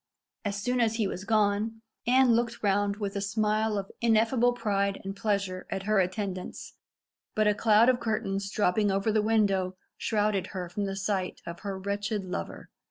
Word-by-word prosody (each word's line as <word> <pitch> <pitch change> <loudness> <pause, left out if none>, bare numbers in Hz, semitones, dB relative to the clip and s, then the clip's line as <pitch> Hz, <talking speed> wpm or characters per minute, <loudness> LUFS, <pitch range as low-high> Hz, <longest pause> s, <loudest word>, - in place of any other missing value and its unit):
As 200 -2 -2
soon 245 +4 0
as 225 -1 +2
he 225 -2 +1
was 190 0 -4
gone, 215 +1 +1 0.2
Anne 255 -1 +5
looked 235 0 0
round 200 0 +2
with 205 -1 -4
a 200 - -1
smile 215 +1 +1
of 195 -1 -4
ineffable 230 +2 +3
pride 200 -4 0
and 195 0 -5
pleasure 195 -3 -1
at 190 - -3
her 215 0 +2
attendants, 185 0 -3 0.6
but 215 - +3
a 210 - +4
cloud 215 +2 +4
of 255 -1 +4
curtains 200 -4 -2
dropping 205 0 +2
over 195 +3 +1
the 215 0 +3
window 195 -4 +1 0.2
shrouded 210 -3 0
her 180 -2 -5
from 200 +3 -2
the 195 0 -3
sight 195 -1 -2
of 170 0 -7
her 200 -2 -4
wretched 200 +1 -2
lover. 180 - -6
205 Hz, 175 wpm, -28 LUFS, 195-220 Hz, 0.6 s, Anne